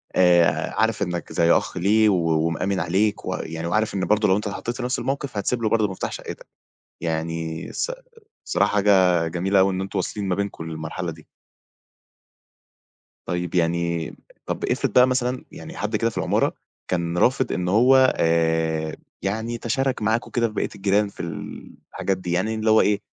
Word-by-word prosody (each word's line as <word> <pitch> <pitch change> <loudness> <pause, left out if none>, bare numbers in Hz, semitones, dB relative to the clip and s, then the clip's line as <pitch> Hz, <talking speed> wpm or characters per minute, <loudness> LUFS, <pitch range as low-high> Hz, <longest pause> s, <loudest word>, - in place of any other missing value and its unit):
آآ 85 -3 +4
عارف 110 -1 +1
إنّك 85 -3 -4
زي 85 -1 +3
أخ - - +1
ليه 105 +3 +4
و 80 -3 +2
ومأمِن 95 +4 -1
عليك 95 +5 0
و - - -2
يعني 80 +1 -5
وعارف 110 +4 0
إن 95 -2 -1
برضه 105 0 +2
لو 95 - +4
أنت 105 0 -2
اتحطّيت 115 +4 -4
في 125 - -4
نَفْس 125 - -1
الموقف، 135 -4 -3
هتسيب 115 +4 -1
له 110 - +2
برضه 110 -2 +2
مفتاح 95 - -4
شقّتك. - - -8 0.5
يعني 80 0 -3
الص - - -2 0.6
الصراحة - - +1
حاجة 95 -4 +4
جميلة 95 +4 +1
أوي 95 0 +3
إن 95 - -2
أنتم 95 0 -3
واصلين 100 +2 -3
ما 90 - +1
بينكم 100 -4 -4
للمرحلة 80 +2 -4
دي. 80 -1 -16 2.0
طيب، 90 0 -3
يعني 85 -1 0
م - - -15 0.3
طَب - - -3
افرض - - -1
بقى 125 0 +7
مثلًا 125 0 -1
يعني - - -10
حد 105 +2 -2
كده 115 +2 +1
في - - -11
العمارة - - +1 0.3
كان 85 -1 -1
رافض 125 +9 +2
إن 90 0 -2
هو 130 +7 +5
آآ 80 -1 +1 0.3
يعني 110 +4 -2
يتشارك 130 +3 -1
معاكم 110 +3 0
كده 115 -1 +1
في 110 - -10
بقيت - - -3
الجيران 100 +1 +2
في - - -21 0.7
الحاجات 95 -1 -1
دي، 90 -1 -5
يعني 95 +6 0
إن 110 - -3
اللي 110 0 +2
هو 110 - +6
إيه، 105 -1 +1
95 Hz, 180 wpm, -23 LUFS, 85-110 Hz, 2.0 s, بقى